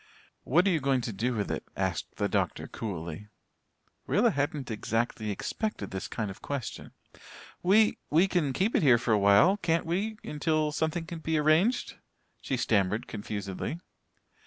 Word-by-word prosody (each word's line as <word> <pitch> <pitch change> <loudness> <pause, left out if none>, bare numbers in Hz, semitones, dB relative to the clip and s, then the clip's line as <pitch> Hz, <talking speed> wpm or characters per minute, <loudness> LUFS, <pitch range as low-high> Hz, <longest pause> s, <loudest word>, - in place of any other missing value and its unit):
"What 170 +8 +4
are 195 - +4
you 165 - +2
going 135 -2 +1
to 115 -2 -4
do 120 +5 -1
with 105 -2 -2
it?" - - -3
asked - - -2
the - - 0
doctor - - -1
coolly. 85 -2 -6 0.8
Rilla - - +3
hadn't 145 -3 -2
exactly 110 0 -1
expected 105 - -3
this 95 - -4
kind 105 -3 -3
of 95 - -12
question. 140 -5 -5 0.7
"We 210 +4 +4
we 165 +6 +4
can 170 -7 +1
keep 195 - 0
it - - +4
here 130 -6 +6
for 120 0 -1
awhile 105 - +5
can't 165 -3 0
we 200 +6 -1
until 155 0 0
something 160 +2 -1
can 165 0 -7
be 160 0 0
arranged?" 155 +11 +2 0.4
she 130 - -2
stammered 105 -2 +1
confusedly. 100 - -5
140 Hz, 160 wpm, -29 LUFS, 110-165 Hz, 0.8 s, here